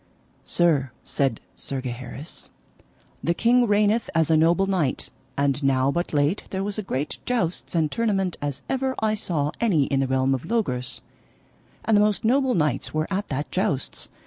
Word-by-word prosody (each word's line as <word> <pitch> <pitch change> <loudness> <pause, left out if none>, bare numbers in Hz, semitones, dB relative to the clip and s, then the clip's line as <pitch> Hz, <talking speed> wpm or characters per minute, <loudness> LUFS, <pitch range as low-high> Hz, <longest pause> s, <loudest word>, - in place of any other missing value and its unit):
Sir, 155 -6 +2
said 135 -5 -1
Sir 135 - -4
Gaheris, 130 +4 -7 0.7
the 170 - +1
king 240 +3 +4
reigneth 210 +2 +2
as 165 -1 +3
a - - +6
noble 170 +4 +4
knight; 180 -9 -1 0.3
and 140 +1 +1
now 135 0 +3
but 175 +4 -2
late 145 +5 +1
there 190 0 -2
was 205 +1 -3
a - - 0
great 145 -7 -3
jousts 185 -9 -2
and 160 -3 +2
tournament 195 -6 0
as 145 -2 -3
ever 265 0 -1
I 215 -1 +1
saw 155 -8 -1
any 190 -11 +3
in 135 0 0
the 135 - +1
realm 130 +1 +2
of 130 - -3
Logris, 125 - -1 0.8
and 220 - +3
the 205 - +6
most 210 0 +1
noble 260 +2 +3
knights 150 -4 0
were 155 0 +1
at 200 +2 -1
that 145 +2 -3
jousts. 145 -7 -1
165 Hz, 170 wpm, -24 LUFS, 140-210 Hz, 0.8 s, a